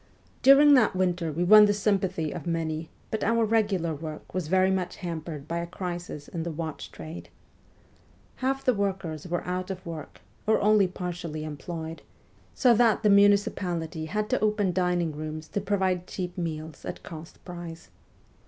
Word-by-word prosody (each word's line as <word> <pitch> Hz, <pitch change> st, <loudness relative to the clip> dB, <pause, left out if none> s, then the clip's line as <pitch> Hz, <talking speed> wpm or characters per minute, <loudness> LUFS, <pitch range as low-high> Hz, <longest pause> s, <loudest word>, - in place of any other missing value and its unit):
During 285 Hz, +2 st, +8 dB
that 235 Hz, -8 st, +4 dB
winter 180 Hz, -3 st, 0 dB
we 165 Hz, +4 st, -1 dB
won 210 Hz, +3 st, +9 dB
the 205 Hz, 0 st, +2 dB
sympathy 190 Hz, -6 st, 0 dB
of -, -, -6 dB
many, 160 Hz, -1 st, -2 dB, 0.2 s
but 220 Hz, -, -1 dB
our 230 Hz, +1 st, +3 dB
regular 205 Hz, -7 st, +1 dB
work 155 Hz, 0 st, -8 dB
was 185 Hz, -4 st, -2 dB
very 190 Hz, +2 st, +3 dB
much 185 Hz, -1 st, -1 dB
hampered 160 Hz, -4 st, -6 dB
by 170 Hz, +1 st, -2 dB
a 170 Hz, -, -4 dB
crisis 175 Hz, -4 st, -6 dB
in 170 Hz, -, -5 dB
the 170 Hz, -, -3 dB
watch 160 Hz, -1 st, -5 dB
trade. 160 Hz, +2 st, -9 dB, 1.1 s
Half 270 Hz, +1 st, -1 dB
the 255 Hz, -, +4 dB
workers 190 Hz, -6 st, -2 dB
were 175 Hz, 0 st, -2 dB
out 180 Hz, +1 st, -3 dB
of 185 Hz, -1 st, -6 dB
work 160 Hz, -3 st, -8 dB, 0.3 s
or 220 Hz, -, +4 dB
only 210 Hz, -1 st, +4 dB
partially 175 Hz, -4 st, -5 dB
employed, 160 Hz, +2 st, -6 dB, 0.5 s
so 250 Hz, -3 st, +5 dB
that 230 Hz, -1 st, +3 dB
the 210 Hz, -, +5 dB
munici 200 Hz, 0 st, +5 dB
pality 165 Hz, -4 st, -4 dB
had 210 Hz, +5 st, -1 dB
to 255 Hz, -, +2 dB
open 210 Hz, -3 st, +1 dB
dining 180 Hz, -2 st, +1 dB
rooms 155 Hz, +1 st, -6 dB
to 205 Hz, -, -2 dB
provide 190 Hz, -2 st, 0 dB
cheap 180 Hz, -2 st, -5 dB
meals 160 Hz, -3 st, -5 dB
at -, -, -6 dB
cost 160 Hz, -1 st, -10 dB
price. 175 Hz, -2 st, -8 dB
180 Hz, 170 wpm, -27 LUFS, 160-200 Hz, 1.1 s, won